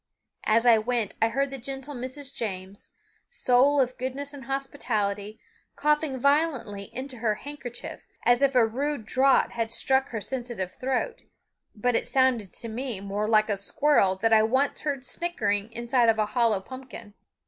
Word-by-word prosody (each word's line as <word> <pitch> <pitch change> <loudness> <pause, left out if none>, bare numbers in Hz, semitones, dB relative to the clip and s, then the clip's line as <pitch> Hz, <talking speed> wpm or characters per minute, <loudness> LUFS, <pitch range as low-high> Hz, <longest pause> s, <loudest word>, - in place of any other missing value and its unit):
As 225 +2 +3
I 230 -2 +7
went 230 -2 -1
I 225 - +5
heard 275 +3 -1
the 270 - -5
gentle 270 +3 -6
Mrs. 260 +2 -5
James, 195 -4 -5 0.4
soul 280 - +3
of 255 -1 0
goodness 275 +3 -4
and 275 -2 -9
hospitality, 220 -7 -2 0.4
coughing 300 -2 +1
violently 265 -8 +1
into 260 0 -6
her 220 -2 +1
handkerchief, 250 -1 -8 0.2
as 240 +1 +4
if 275 -1 +3
a 245 -2 +6
rude 270 +2 -2
draught 265 +4 +3
had 230 -1 -2
struck 265 +3 +2
her 225 - -3
sensitive 235 -4 -4
throat; 265 - -2 0.5
but 245 +3 0
it - - 0
sounded 255 -7 +2
to 230 - -5
me 235 -1 -3
more 200 +2 -2
like 215 -1 +4
a 205 - +1
squirrel 200 -2 +2
that 225 +4 +1
I 220 - +7
once 260 +6 +1
heard 280 -3 -3
snickering 225 -8 -1
inside 235 +1 +2
of 225 - +3
a 215 - +2
hollow 230 -5 +2
pumpkin. 245 -2 -10
245 Hz, 165 wpm, -26 LUFS, 220-270 Hz, 0.5 s, I